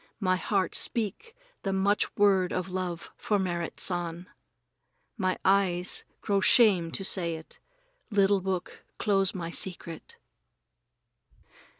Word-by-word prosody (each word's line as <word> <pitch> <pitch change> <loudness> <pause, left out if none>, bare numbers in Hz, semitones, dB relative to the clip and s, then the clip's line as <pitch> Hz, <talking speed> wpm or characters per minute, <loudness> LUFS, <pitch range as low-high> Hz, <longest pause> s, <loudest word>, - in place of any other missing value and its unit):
My 185 -3 +2
heart 190 0 0
speak 240 - -2 0.3
the 195 - -2
much 195 +2 +1
word 195 -3 +4
of 185 0 -3
love 180 -2 -4
for 210 - 0
Merrit 175 -3 -3
San. 175 -1 -1 0.9
My 185 -3 0
eyes 185 -2 +2 0.2
grow 200 -1 +1
shame 195 -6 +6
to 195 - -3
say 170 -4 0
it. 160 0 -10 0.5
Little 200 -2 +3
book, 185 -1 -4
close 195 -3 +1
my 170 -2 -4
secret! 180 - -6
190 Hz, 115 wpm, -28 LUFS, 175-200 Hz, 0.9 s, shame